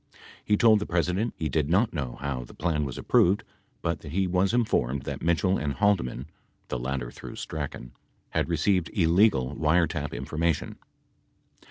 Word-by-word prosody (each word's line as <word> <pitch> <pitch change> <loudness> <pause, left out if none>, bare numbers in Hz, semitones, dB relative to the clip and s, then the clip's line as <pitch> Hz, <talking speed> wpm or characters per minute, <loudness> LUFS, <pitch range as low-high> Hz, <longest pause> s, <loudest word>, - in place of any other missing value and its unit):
He 105 - +2
told 110 -1 +6
the 105 - -4
President 90 +6 0
he 80 - -1
did 75 0 0
not 100 +7 +2
know 70 -7 -4
how 70 -3 -3
the - - -14
plan 75 -3 0
was 65 - -6
approved 95 +4 +3 0.4
but - - -1
that 70 - -9
he 95 +1 +2
was 90 +1 +2
informed 70 - +1
that - - -5
Mitchell 85 +3 +2
and 75 -2 -2
Halde 100 +1 +3
man 65 +1 -6 0.4
(the 65 - -2
latter 65 -1 -3
through - - -9
Strachan) 70 -5 -6 0.4
had - - 0
received 85 +2 +1
illegal 85 - +3
wiretap 80 -2 +1
infor 65 +5 -5
mation. 85 -2 0
80 Hz, 170 wpm, -27 LUFS, 70-95 Hz, 0.4 s, told